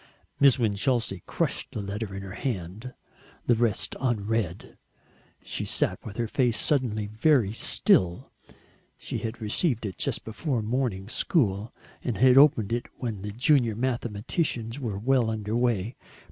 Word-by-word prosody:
Miss 140 -1 +6
Winchelsea 110 -3 0
crushed - - -2
the - - -4
letter 100 0 -4
in 100 - -6
her 95 -1 -7
hand 110 +1 -5 0.5
the 120 - +4
rest 115 -2 0
unread 110 -6 -2 0.6
and - - -25 0.2
sat - - 0
with 105 0 -8
her 120 -1 0
face 120 -1 +1
suddenly 120 -7 +1
very 110 +1 +2
still. 90 -4 +2 0.7
She - - -4
had 110 +1 -5
received 115 - 0
it 95 -3 -6
just - - -1
before 120 +1 -2
morning 110 -4 -1
school, 110 - +1 0.3
and 115 -5 -2
had 130 +4 +6
opened 135 -7 +5
it 120 - -2
when 110 -6 -4
the 105 - -5
junior 120 0 +3
mathematicians 120 - -2
were 115 -7 -3
well 120 +1 +2
under 110 0 -3
way. 120 -2 0
115 Hz, 145 wpm, -27 LUFS, 105-125 Hz, 0.7 s, Miss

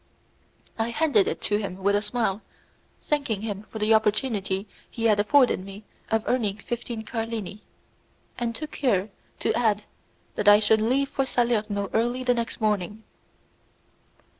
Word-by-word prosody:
I 225 - +1
handed 320 - +2
it 455 - -3
to 205 - +1
him 200 -3 -4
with 200 +1 +3
a 205 - +2
smile, 210 -1 -1 0.6
thanking 280 -9 -1
him 210 -1 -5
for - - -7
the 215 +1 +3
opportunity 210 -2 +1 0.2
he 230 - -4
had 210 -2 +4
afforded 245 -2 +4
me 195 +2 -10 0.3
of 225 -1 +1
earning 215 -5 0
fifteen 235 +1 -5
carlini, 225 -3 -4 0.7
and 235 -2 -2
took 305 +4 -6
care 210 -7 0 0.3
to 220 - +1
add 215 -3 +1 0.5
that 210 - -1
I 205 0 +9
should 215 0 +3
leave 265 +5 +1
for 270 -1 -1
Salerno 215 -5 0
early 240 +3 +1
the 250 -1 +3
next 235 -1 -3
morning. 210 0 -1
220 Hz, 150 wpm, -25 LUFS, 205-240 Hz, 0.7 s, I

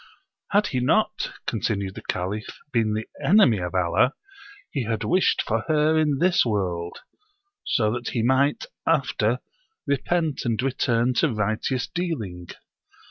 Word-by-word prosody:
Had 205 0 +2
he 130 - -1
not 215 +12 +1
[continued 100 -4 -2
the - - -8
Caliph] 100 +4 -4
been 110 -4 +1
the 110 +1 -3 0.2
enemy 170 - +5
of 90 +1 -4
Allah, 90 +8 +2 0.6
he 135 -5 -2
had 110 -1 -2
wished 185 +2 +2
for 115 0 0
her 155 0 +3
in 150 -3 +2
this 175 +4 +3
world; 90 -6 -2 0.7
so 110 -2 +1
that 120 -1 -3
he 115 - -1
might, 130 - +2 0.2
after, - - +1 0.4
repent 155 +1 0
and 115 -3 -1
return 125 -2 +1
to 160 - +2
righteous 110 +4 -1
dealing. 110 - -4
120 Hz, 135 wpm, -24 LUFS, 105-150 Hz, 0.7 s, enemy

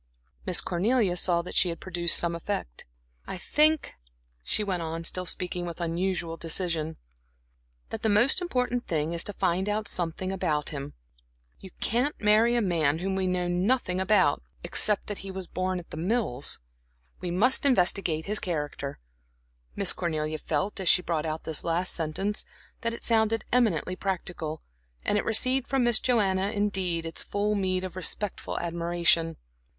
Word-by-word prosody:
Miss - - +4
Cornelia 200 +1 +1
saw 175 -1 +3
that - - -8
she 180 - +4
had 165 - -5
produced 175 -2 +2
some 170 0 0
effect. 170 - -4 0.4
"I - - -5
think," 305 - +2 0.5
she 210 - 0
went 185 -4 -2
on, 165 0 -4
still 180 +2 -1
speaking 180 0 -3
with 170 -1 -6
unusual 170 0 -1
decision, 165 -1 -1 0.9
"that - - -4
the 220 - +1
most 235 - +3
important 250 -7 -1
thing 160 0 -1
is 170 - +1
to - - -1
find 190 +1 0
out 210 0 -1
something 180 +1 -2
about 160 -6 -1
him. 140 -2 -6 0.6
You 190 - -11
can't 250 +6 0
marry 220 +3 +4
a 235 - +2
man 160 -5 +1
whom 190 +3 -2
we 190 -1 0
know 180 -1 0
nothing 185 +1 +1
about, 190 - +3 0.2
except 210 -2 +2
that 205 - -5
that - - -9
he 195 - -7
was 190 -1 -5
born 185 +1 -2
at 175 - -9
The - - -6
Mills. 175 - +1 0.6
We 180 - -4
must 215 +10 +4
investigate 180 - +2
his 210 +1 0
character." 150 -5 -4 0.8
Miss - - +5
Cornelia 155 -2 -2
felt, 160 +9 -2
as 190 - +2
she 180 - +5
brought 160 -3 -1
out 155 0 -4
this 160 -2 +2
last 170 +2 0
sentence, 180 +6 -1 0.4
that 230 0 -2
it - - -11
sounded 225 -1 +2
eminently 215 -7 +2
practical, 175 -5 -4 0.4
and - - +2
it - - -2
received 255 +4 +3
from 270 -2 +1
Miss 240 -2 +4
Joanna, 195 -5 +1
indeed, 190 -5 -1
its 165 - -3
full 205 +1 -1
meed 185 -2 0
of 185 -1 -6
respectful 190 +2 -2
admiration. 170 -1 +1
185 Hz, 165 wpm, -27 LUFS, 165-210 Hz, 0.9 s, Miss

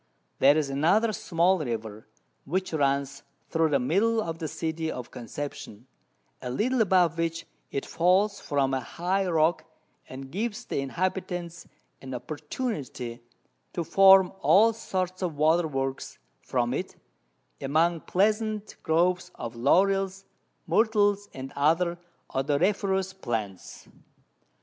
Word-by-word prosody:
There's 145 +2 +5
another 195 +11 +2
small 175 +1 +1
River, 110 -6 -5 0.4
which 185 +3 -2
runs 140 -2 0 0.3
through 160 -1 +2
the 145 - +3
middle 200 - +2
of 165 -6 -3
the 160 - -3
City 160 +1 -3
of 125 -1 -7
Conception, 125 -2 -7 0.6
a 125 - -5
little 235 - +1
above 180 -5 +3
which 165 0 -2 0.2
it 140 - -3
falls 190 +4 +2
from 140 -2 0
a 130 - +1
high 185 +8 -1
Rock, 160 -1 +2 0.5
and 135 +1 -9
gives 215 +3 -3
the - - -2
Inhabitants 175 +3 -3 0.3
an 130 -1 -6
Opportunity 140 - -5 0.5
to 170 - -2
form 190 +2 +6
all 225 +3 +5
sorts 185 -4 -3
of 175 -4 -2
Water 160 +3 +3
works 135 -2 -4 0.2
from 120 -1 -1
it, 185 +7 -4 0.7
among 160 +5 +2
pleasant 215 +2 0
Groves 180 +3 +1
of 120 0 -6
Lawrels, 195 +8 +2 0.4
Myrtles, 205 -2 +2
and 135 0 -8
other 170 +4 +2 0.3
odoriferous 190 +7 0
Plants. 115 - -5
165 Hz, 120 wpm, -27 LUFS, 140-190 Hz, 0.7 s, form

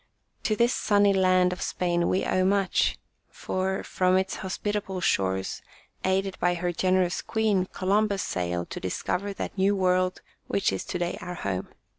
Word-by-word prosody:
To 215 - +2
this 235 +2 +3
sunny 205 -1 +3
land 185 -1 +3
of 180 - -8
Spain 175 -1 0
we 185 - +1
owe 185 - +2
much, 195 0 +2 0.3
for, 190 +1 -2
from 185 0 +2
its 190 0 -1
hospitable 195 0 -3
shores, 95 - 0 0.4
aided 190 0 0
by 175 0 +2
her 175 0 -1
generous 185 0 +1
queen, 215 -4 +1
Columbus 200 +1 +1
sailed 90 -1 -2
to - - -4
discover 190 - -2
that - - -5
New 200 +2 +3
World 185 -1 +1 0.2
which 195 - +1
is 95 - -3
to - - -3
day 175 0 -2
our 180 - -5
home. 95 - -3
185 Hz, 160 wpm, -27 LUFS, 175-195 Hz, 0.4 s, this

